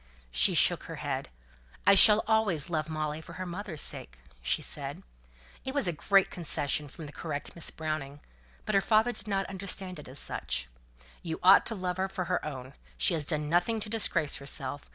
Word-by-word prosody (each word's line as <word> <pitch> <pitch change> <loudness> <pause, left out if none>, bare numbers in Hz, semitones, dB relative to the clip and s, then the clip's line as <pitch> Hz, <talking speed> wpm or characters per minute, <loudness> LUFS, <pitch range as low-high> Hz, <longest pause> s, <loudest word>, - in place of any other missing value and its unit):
She - - +3
shook - - +3
her - - -7
head. - - -4 0.6
"I 200 - +7
shall 210 +2 +7
always 205 -9 +1
love 155 -1 -1
Molly 155 0 -3
for - - -12
her 185 - -5
mother's 175 -3 -5
sake," - - -1 0.2
she 60 - +1
said. - - -4
And - - -16 0.6
it 265 +1 -5
was 280 - +3
a 175 - 0
great 195 +5 +3
concession 150 -3 -1
from 155 +3 -10
the 145 - -9
correct 145 -2 -5
Miss 170 - -1
Browning. 155 -3 -4 0.5
But 215 - -2
her 195 - +4
father 220 +3 +3
did 235 - -5
not 195 -1 0
understand 190 -2 -3
it 150 - -10
as 130 - -5
such. 60 - -2 0.5
"You 160 -2 -4
ought 190 +2 +7
to 225 - -2
love 180 -2 -3
her 190 +1 -1
for 190 -2 -4
her 180 +1 -1
own. 130 -3 -7 0.2
She - - +4
has 155 -3 -1
done 150 -1 -1
nothing 175 +8 +1
to 215 - -4
disgrace 205 -9 +2
herself. 140 0 -4
170 Hz, 200 wpm, -29 LUFS, 150-195 Hz, 0.6 s, I